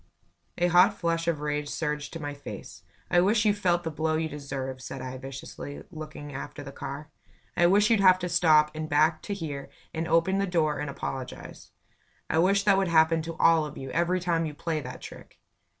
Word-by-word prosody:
A 175 - +2
hot 175 +1 +6
flush 165 -1 -1
of 160 -3 0
rage 150 0 -2
surged 150 -2 -3
to 165 - -5
my 145 -1 -4
face. 145 - -9 0.3
"I 175 - +5
wish 210 +4 +3
you 210 - +5
felt 175 -4 +1
the 160 - -3
blow 155 +1 0
you 160 0 0
deserve," 135 -3 -5
said 135 - -7
I, 130 0 -6
viciously, 135 +1 -8
looking 155 -3 -8
after 140 +1 -7
the 135 - -8
car. 145 +2 -7 0.4
"I 175 - +5
wish 205 +4 +4
you'd 225 - +4
have 185 -2 +7
to 180 -1 -3
stop, 155 -3 +4
and 155 0 -5
back 155 +2 +3
to 200 - -4
here, 150 -7 -5 0.2
and 160 0 -2
open 170 +4 +2
the 200 - 0
door 160 -4 +1
and 150 -1 -3
apologize. 135 -2 -6 0.6
I 160 - +2
wish 195 +3 +3
that 200 -1 +4
would 195 - +1
happen 165 0 +4
to 165 +1 -6
all 165 -1 +5
of 150 -1 -7
you, 135 -1 -6
every 175 +2 +1
time 170 -2 0
you 150 - -7
play 155 0 -2
that 125 -1 -8
trick." - - -11
160 Hz, 210 wpm, -27 LUFS, 145-175 Hz, 0.6 s, have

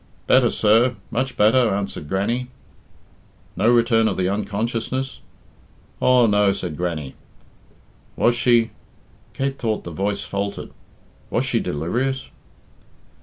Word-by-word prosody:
"Better, 125 -2 +4
sir 115 +4 +3 0.2
much 130 +2 -2
better," 115 +3 +4
answered 100 -7 -3
Grannie. 115 +6 -1 1.1
"No 110 +4 +2
return 115 -2 +4
of 100 - -1
the 90 -1 +1
unconsciousness?" 115 +6 -2 0.8
"Aw, 125 -1 +5
no," 105 -2 +3
said 90 -5 -5
Grannie. 80 -5 -3 1.0
"Was 120 - +3
she" 120 -2 +3 0.6
Kate 135 0 -2
thought 110 -2 -1
the 85 - -7
voice 100 +5 -2
faltered 100 0 -4 0.6
"was - - 0
she - - 0
delirious?" 125 - -2
110 Hz, 115 wpm, -22 LUFS, 100-120 Hz, 1.1 s, Aw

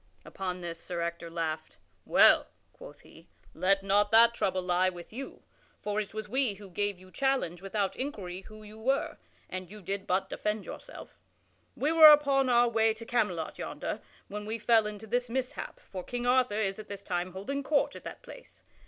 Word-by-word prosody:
Upon 185 -1 -5
this 170 -1 -6
Sir 175 -1 -5
Ector 170 0 -4
laughed. 160 -2 -4 0.3
"Well," - - +6 0.3
quoth - - -13
he, - - -17 0.3
"let 195 +1 +2
not 205 +1 +3
that 230 +2 +7
trouble 185 -5 -1
lie 180 +1 +2
with 175 +2 -11
you, 270 +3 -8 0.4
for 210 0 -1
it 205 - -7
was 215 -1 -5
we 250 -2 +1
who 195 -1 -12
gave 205 +1 -1
you 185 0 -16
challenge 265 -11 0
without 195 0 -1
inquiry 195 -10 -5
who 215 +2 -13
you 215 +1 -12
were, 270 +5 0 0.3
and 185 -1 -6
you 210 +2 -10
did 195 +1 -4
but 190 +1 +1
defend 210 +1 -3
yourself. - - -10 0.6
We 295 +3 +1
were 315 -2 +10
upon 280 -3 +4
our 240 0 +5
way 225 -1 +2
to 230 +1 -8
Camelot 210 -10 -1
yonder, - - -4 0.3
when 210 +1 -6
we 220 +1 -2
fell 225 -1 +3
into 210 +1 -7
this 245 +2 -1
mishap, 255 +1 -4
for 185 -2 -8
King 245 +4 -4
Arthur 250 -4 +3
is 195 -1 -1
at 215 - -9
this 200 -1 -8
time 180 -1 -2
holding 240 +10 -3
court 285 +1 +1
at - - -10
that - - -9
place. - - -13
210 Hz, 190 wpm, -30 LUFS, 185-240 Hz, 0.6 s, were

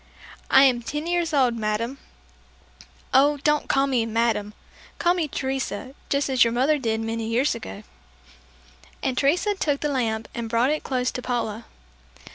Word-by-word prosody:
"I 270 - +7
am 250 -3 +4
ten 295 +6 -4
years 345 -1 0
old, 260 -5 +3
madame." 225 +5 -2 1.1
"Oh, 285 +3 +5
don't 300 0 +1
call 270 0 +3
me 255 -4 +1
'madame.' 225 -2 0 0.4
Call 345 - +3
me 345 -4 -1
Teresa, 265 -3 -3 0.2
just 280 0 +1
as 260 -2 +4
your 230 - +1
mother 280 +5 +2
did 225 -3 -1
many 225 0 -3
years 245 +6 +1
ago." 95 +1 -8 1.2
And 260 - 0
Teresa 340 +10 +2
took 295 -7 -1
the 295 - 0
lamp 225 -5 -1
and 235 -1 -4
brought 235 +4 +2
it 305 - -1
close 255 -1 -1
to 250 - -5
Paula. 235 -3 -3
260 Hz, 160 wpm, -24 LUFS, 230-290 Hz, 1.2 s, I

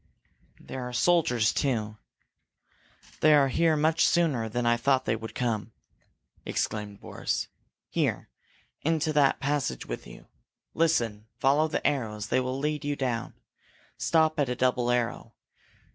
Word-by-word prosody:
"There 130 - -7
are - - -9
soldiers, 125 -6 +3
too. 110 -6 -1 1.2
They 155 0 +6
are 140 -2 +4
here 160 +4 +2
much 160 +2 +2
sooner 140 -10 +1
than 120 +2 -2
I 120 0 +4
thought 130 +2 +1
they 110 - +1
could 110 0 -8
come!" 115 -3 -2 0.7
exclaimed 105 -2 -3
Boris. - - -3 0.4
"Here, - - -1 0.5
into 160 0 0
that 145 -2 +3
passage 140 - -1
with - - -6
you! - - -13 0.5
Listen! 115 -10 0
Follow 140 +5 +3
the 155 - -3
arrows! 110 -6 -1
They - - +2
will 130 +1 -2
lead 150 +2 -2
you 145 0 -1
down. 125 -4 -3 0.6
Stop 160 -1 +2
at 140 -3 +1
a 125 - -1
double 125 -1 +1
arrow. 120 -1 -1
130 Hz, 140 wpm, -27 LUFS, 115-150 Hz, 1.2 s, They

